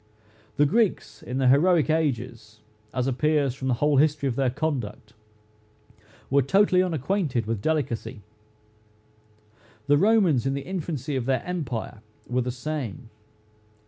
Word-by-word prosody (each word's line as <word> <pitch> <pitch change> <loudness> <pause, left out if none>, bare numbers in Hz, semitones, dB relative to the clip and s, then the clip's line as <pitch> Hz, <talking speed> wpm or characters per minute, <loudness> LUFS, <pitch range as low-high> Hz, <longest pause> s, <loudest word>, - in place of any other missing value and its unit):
The 145 - +5
Greeks, 160 - 0
in 125 - -5
the 135 -1 +2
heroic 160 +4 +4
ages, 120 -8 -2 0.3
as 125 -1 -1
appears 140 +1 +1
from 130 0 -5
the 125 - +2
whole 145 +3 +2
history 145 -1 +2
of 125 - -2
their 135 -1 +1
conduct, 125 -7 -4 1.2
were 140 0 +4
totally 185 +6 +3
unacquainted 160 - -1
with 110 -2 -3
delicacy. 130 -6 -2 1.6
The 145 +1 +4
Romans 190 - +3
in 135 - 0
the 140 - -5
infancy 160 -6 -4
of 130 -2 -2
their 130 -2 +1
empire, 130 - -4 0.3
were 125 +1 0
the 125 - -3
same. 130 -3 -5
140 Hz, 135 wpm, -25 LUFS, 125-155 Hz, 1.6 s, The